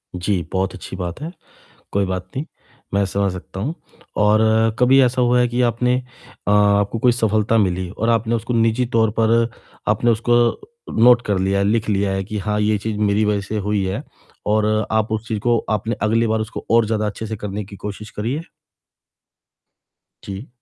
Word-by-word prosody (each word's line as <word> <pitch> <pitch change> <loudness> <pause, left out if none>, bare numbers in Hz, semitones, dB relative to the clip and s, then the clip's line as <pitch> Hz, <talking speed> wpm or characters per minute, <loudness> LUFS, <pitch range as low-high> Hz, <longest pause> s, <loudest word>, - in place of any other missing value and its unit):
जी, 90 +1 0
बहुत 95 0 0
अच्छी 90 - -8
बात 90 - -5
है। 160 +3 -5 0.6
कोई 100 0 +2
बात 95 -1 -3
नहीं, 140 - -2 0.5
मैं 100 0 +3
समझ 100 0 0
सकता 95 +1 -8
हूँ 140 +11 -2 0.4
और 105 +1 +4 0.4
कभी 130 +2 +5
ऐसा 125 0 +2
हुआ 125 0 +3
है 120 - +3
कि 120 +1 -1
आपने 125 +1 +2 0.5
अ, - - +3
आपको 105 +1 +3
कोई 125 +2 +4
सफलता 110 -1 +1
मिली 95 -3 0
और 115 +4 -2
आपने 115 0 +1
उसको 115 +1 -2
निज़ी 115 +2 +2
तौर 110 -1 +4
पर 115 +1 +3 0.4
आपने 120 - +2
उसको 115 +1 +1 0.6
नोट 120 +1 +6
कर 100 -2 +1
लिया, 95 +1 +1
लिख 110 +2 +1
लिया 100 -1 +1
है 95 0 -2
कि 105 +2 -5
हाँ, 105 +1 -1
ये 105 0 +2
चीज़ 105 +1 -4
मेरी 105 0 +2
वजह 105 -1 +1
से 100 +2 -5
हुई 105 -1 0
है। 95 0 -3 0.5
और 105 0 +2 0.3
आप 110 -1 +1
उस 110 +1 -2
चीज़ 110 - -1
को 120 +2 +2
आपने 110 +2 -1
अगली 115 +2 +2
बार 110 0 0
उसको 110 - -5
और 115 -1 +4
ज़्यादा 110 0 0
अच्छे 105 +2 -4
से 110 0 -4
करने 105 0 -5
की 100 +1 -11
कोशिश 105 +1 -7
करी 105 +4 -3
है? 155 - -4 1.8
जी। 100 +6 -7
105 Hz, 190 wpm, -20 LUFS, 100-115 Hz, 1.8 s, नोट